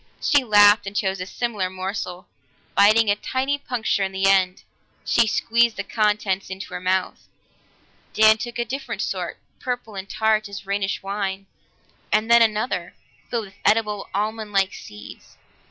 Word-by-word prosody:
She 290 Hz, -2 st, +3 dB
laughed 205 Hz, -2 st, +5 dB
and 195 Hz, -, -6 dB
chose 190 Hz, -2 st, -1 dB
a 185 Hz, -, -5 dB
similar 210 Hz, -6 st, -2 dB
morsel; 185 Hz, -1 st, -5 dB, 0.5 s
biting 215 Hz, +1 st, +5 dB
a -, -, +2 dB
tiny 265 Hz, +6 st, -2 dB
puncture 240 Hz, -6 st, -1 dB
in 190 Hz, -, -2 dB
the 190 Hz, 0 st, -1 dB
end, 190 Hz, -1 st, +3 dB, 0.4 s
she 235 Hz, -2 st, +3 dB
squeezed 235 Hz, +1 st, +2 dB
the 200 Hz, -, -2 dB
contents 210 Hz, -2 st, 0 dB
into 190 Hz, 0 st, -7 dB
her -, -, -4 dB
mouth. 185 Hz, +1 st, -1 dB, 0.9 s
Dan 220 Hz, 0 st, +6 dB
took 240 Hz, +1 st, -5 dB
a 240 Hz, -, -1 dB
different 250 Hz, -3 st, -4 dB
sort, 180 Hz, -3 st, -4 dB, 0.2 s
purple 245 Hz, -3 st, -4 dB
and 195 Hz, 0 st, -7 dB
tart 215 Hz, -1 st, +1 dB
as 200 Hz, -1 st, -8 dB
Rhenish 200 Hz, 0 st, -2 dB
wine, 195 Hz, -1 st, -3 dB, 0.7 s
and 215 Hz, +2 st, +1 dB
then 235 Hz, 0 st, +7 dB
another, 215 Hz, -5 st, 0 dB, 0.3 s
filled 230 Hz, -3 st, -2 dB
with 195 Hz, 0 st, -16 dB
edible, 210 Hz, -2 st, +1 dB
almond 215 Hz, +1 st, -3 dB
like 195 Hz, -1 st, +1 dB
seeds. 105 Hz, 0 st, -12 dB
210 Hz, 155 wpm, -23 LUFS, 195-225 Hz, 0.9 s, then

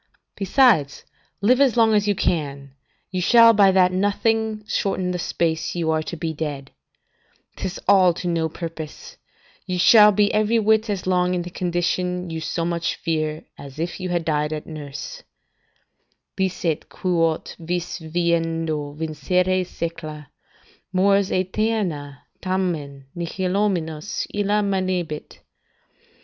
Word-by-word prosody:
Besides, 195 Hz, -, +3 dB, 0.4 s
live 250 Hz, +6 st, +4 dB
as 260 Hz, -4 st, +3 dB
long 225 Hz, -1 st, +5 dB
as 210 Hz, -1 st, +2 dB
you 205 Hz, -, +2 dB
can, 140 Hz, -6 st, -2 dB, 0.4 s
you 185 Hz, -1 st, -2 dB
shall 230 Hz, +4 st, +7 dB
by 200 Hz, -2 st, +5 dB
that 185 Hz, -1 st, +4 dB
nothing 215 Hz, +3 st, 0 dB
shorten 190 Hz, -3 st, -1 dB
the 180 Hz, -, -3 dB
space 165 Hz, -1 st, -1 dB
you 165 Hz, -2 st, 0 dB
are 155 Hz, 0 st, +1 dB
to 170 Hz, +2 st, -6 dB
be 160 Hz, 0 st, -3 dB
dead; 145 Hz, -3 st, -5 dB, 0.8 s
'tis 185 Hz, -, -5 dB
all 190 Hz, -2 st, +6 dB
to 180 Hz, -, -5 dB
no 165 Hz, -2 st, 0 dB
purpose; 165 Hz, -2 st, -8 dB, 0.5 s
you 180 Hz, -, -2 dB
shall 210 Hz, +3 st, +7 dB
be 205 Hz, 0 st, +2 dB
every 215 Hz, +2 st, +2 dB
whit 220 Hz, 0 st, +2 dB
as 200 Hz, -3 st, -2 dB
long 180 Hz, -1 st, +1 dB
in 175 Hz, -, -1 dB
the 175 Hz, -, -8 dB
condition 180 Hz, 0 st, -1 dB
you 160 Hz, 0 st, -4 dB
so 165 Hz, +1 st, -2 dB
much 170 Hz, 0 st, -1 dB
fear, 155 Hz, -2 st, -2 dB
as 140 Hz, 0 st, -10 dB
if 170 Hz, +4 st, -4 dB
you 185 Hz, -1 st, -4 dB
had 175 Hz, -2 st, -1 dB
died 150 Hz, -1 st, 0 dB
at 155 Hz, -1 st, -4 dB
nurse: 155 Hz, -, -8 dB, 1.1 s
"'Licet 180 Hz, -4 st, -2 dB
quot 165 Hz, -3 st, -1 dB
vis 175 Hz, +2 st, -3 dB
vivendo 165 Hz, -2 st, -1 dB
vincere 180 Hz, +5 st, 0 dB
secla, 160 Hz, -4 st, -6 dB, 0.6 s
Mors 195 Hz, +1 st, +3 dB
aeterna 185 Hz, -7 st, -1 dB, 0.2 s
tamen 170 Hz, -7 st, -2 dB
nihilominus 180 Hz, -1 st, -2 dB
illa 205 Hz, +1 st, +1 dB
manebit. 185 Hz, -5 st, -2 dB
180 Hz, 135 wpm, -22 LUFS, 160-195 Hz, 1.1 s, shall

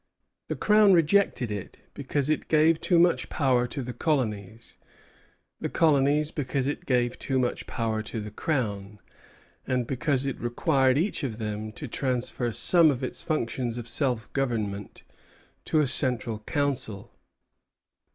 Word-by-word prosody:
The -, -, -3 dB
Crown 210 Hz, -2 st, +5 dB
rejected 165 Hz, -, +2 dB
it 100 Hz, -2 st, -6 dB, 0.2 s
because 140 Hz, 0 st, -2 dB
it 155 Hz, -1 st, -1 dB
gave 160 Hz, +1 st, +3 dB
too 175 Hz, -, +2 dB
much 170 Hz, 0 st, +3 dB
power 125 Hz, -4 st, +1 dB
to 135 Hz, +2 st, -4 dB
the 125 Hz, 0 st, -6 dB
colonies; 115 Hz, -, -2 dB, 0.8 s
the -, -, -3 dB
colonies, 150 Hz, -1 st, +2 dB
because 140 Hz, -3 st, -2 dB
it 145 Hz, -, -4 dB
gave 120 Hz, -2 st, +1 dB
too 135 Hz, -, -1 dB
much 125 Hz, -1 st, -1 dB
power 110 Hz, -2 st, -2 dB
to 110 Hz, +1 st, -5 dB
the 105 Hz, 0 st, -7 dB
Crown, 105 Hz, -9 st, -3 dB, 0.7 s
and 125 Hz, -2 st, 0 dB
because 135 Hz, +1 st, 0 dB
it 135 Hz, -, -3 dB
required 130 Hz, +2 st, +2 dB
each 170 Hz, 0 st, 0 dB
of 115 Hz, -6 st, -3 dB
them 110 Hz, -1 st, -4 dB
to 145 Hz, -, -7 dB
transfer 125 Hz, -1 st, -2 dB
some 160 Hz, -, +5 dB
of 135 Hz, -2 st, -2 dB
its 130 Hz, -, -2 dB
functions 120 Hz, -6 st, -2 dB
of 120 Hz, -1 st, -6 dB
self 120 Hz, -2 st, -1 dB
government 110 Hz, -7 st, -3 dB, 0.6 s
to 155 Hz, -, +2 dB
a -, -, +2 dB
central 125 Hz, -4 st, 0 dB
council. 135 Hz, -8 st, -2 dB
130 Hz, 145 wpm, -26 LUFS, 115-150 Hz, 0.8 s, Crown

